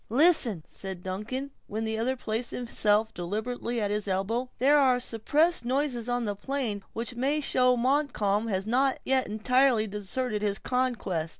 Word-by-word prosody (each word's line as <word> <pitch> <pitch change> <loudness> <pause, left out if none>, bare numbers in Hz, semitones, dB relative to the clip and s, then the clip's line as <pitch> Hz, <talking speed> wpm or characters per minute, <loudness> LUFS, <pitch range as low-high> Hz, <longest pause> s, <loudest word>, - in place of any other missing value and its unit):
"Listen!" 245 - +4
said 190 -2 -8
Duncan, 225 +9 -4 0.2
when 220 +2 -3
the 220 0 -2
other 255 +3 0
placed 235 -1 -3
himself 220 -2 +1
deliberately 220 +6 -3
at 205 -2 -1
his 210 0 -2
elbow; 210 +7 -1
"there 285 +3 +5
are 255 -3 +4
suppressed 290 +9 +1
noises 250 -2 -1
on 245 -1 0
the 205 - -1
plain 230 -2 -2
which 235 +2 -4
may 270 +5 0
show 250 -3 +3
Montcalm 235 -5 +1
has 195 -2 -1
not 260 +4 +2
yet 265 -1 +2
entirely 240 +2 +2
deserted 210 +2 -3
his 205 -1 0
conquest." 230 -12 -1
235 Hz, 160 wpm, -28 LUFS, 210-260 Hz, 0.2 s, there